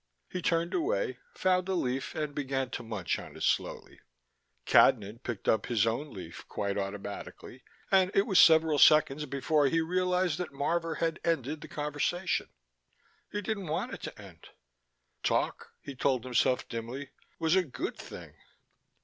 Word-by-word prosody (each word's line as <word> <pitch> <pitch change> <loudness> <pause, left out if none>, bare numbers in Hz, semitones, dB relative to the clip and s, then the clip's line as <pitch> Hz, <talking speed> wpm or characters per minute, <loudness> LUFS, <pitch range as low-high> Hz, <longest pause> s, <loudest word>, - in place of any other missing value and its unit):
He 180 - -5
turned 170 +1 +1
away, 430 +4 0 0.2
found 185 - +1
a 190 - +1
leaf 130 -5 -2
and 150 -2 -2
began 135 -2 -2
to - - -4
munch 110 -6 -2
on - - -10
it - - -6
slowly. - - -1 0.7
Cadnan 105 +4 +4
picked 120 -6 -5
up 110 - +2
his 115 -3 +2
own 125 +6 -2
leaf 90 -4 -9
quite 100 -1 -2
automatically, 100 +5 -6 0.3
and 190 -1 +5
it 195 - +4
was 190 -6 +4
several 160 -2 +6
seconds 150 -1 +5
before 140 +2 +2
he 165 +4 +2
realized 180 0 +1
that 180 - -3
Marvor 165 +3 -1
had 165 -1 -1
ended 150 -2 -1
the - - -8
conversation. 150 +5 -1 0.8
He 205 0 -3
didn't 200 -3 -3
want 155 +2 -2
it - - -7
to - - -7
end. - - -13 0.7
Talk, - - 0
he 140 - -7
told 130 -2 0
himself 125 0 +1
dimly, 120 +4 -6 0.3
was 160 +2 +2
a 190 - +5
good 145 - -5
thing. - - -10
150 Hz, 160 wpm, -30 LUFS, 125-175 Hz, 0.8 s, several